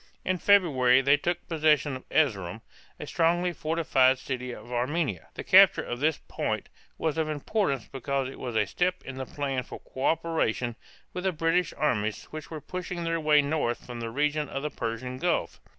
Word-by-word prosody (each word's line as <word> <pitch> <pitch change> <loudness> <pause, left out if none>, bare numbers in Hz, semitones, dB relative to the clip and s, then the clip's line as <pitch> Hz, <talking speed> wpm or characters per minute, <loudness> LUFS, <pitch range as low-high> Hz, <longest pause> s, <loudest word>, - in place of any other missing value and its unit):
In 185 -1 0
February 135 -12 +5
they 140 +2 +5
took 175 +4 -2
possession 150 -3 +2
of 130 - -11
Erz´erum, 110 - +1 0.4
a - - -5
strongly 175 +2 +1
fortified 150 -5 +2
city 125 -1 -4
of 120 - -10
Armenia. 125 - -1
The - - -5
capture - - +6
of 120 - -5
this 150 +1 +2
point - - -3 0.3
was 160 0 -1
of 155 -1 0
importance 145 - -1
because 135 +1 -2
it 135 - -9
was 125 -3 -5
a 110 -1 +3
step 180 - -1
in 130 0 -7
the 130 -1 -5
plan 135 -3 -2
for - - -9
coöperation 135 -5 -1 0.4
with 180 - -4
the 190 - +3
British 165 +1 +1
armies 110 -7 0
which 155 -3 -7
were 160 - -6
pushing 180 +2 -5
their 165 0 0
way 150 -2 +4
north 140 -5 -1
from 120 -1 -7
the 115 -1 -4
region 150 +4 0
of 135 - -4
the 150 - -2
Persian 125 +3 -4
Gulf. 175 0 -1
145 Hz, 180 wpm, -28 LUFS, 125-165 Hz, 0.4 s, capture